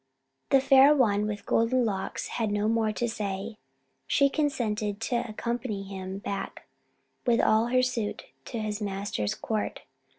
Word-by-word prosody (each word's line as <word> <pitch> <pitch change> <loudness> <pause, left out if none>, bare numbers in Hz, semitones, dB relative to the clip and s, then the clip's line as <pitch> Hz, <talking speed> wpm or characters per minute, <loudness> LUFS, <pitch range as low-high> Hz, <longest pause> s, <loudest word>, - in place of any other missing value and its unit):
The 275 - +6
Fair 270 +2 +6
One 210 -6 +2
with 205 -1 -5
Golden 240 +2 +2
Locks 195 -3 -3
had 225 -3 -1
no 205 +1 0
more 225 -1 +2
to 235 +3 -1
say. 210 -1 -4 0.5
She 280 -1 +3
consented 215 -9 -1
to 240 +1 0
accompany 235 -1 -3
him 190 -1 -6
back, 200 -2 -5 0.6
with 235 -1 +4
all 220 +2 +4
her 255 +1 +3
suite, 235 -5 -2 0.2
to 240 - -5
his 215 -1 -3
master's 195 - -2
court. 215 -2 -3
220 Hz, 145 wpm, -28 LUFS, 205-240 Hz, 0.6 s, The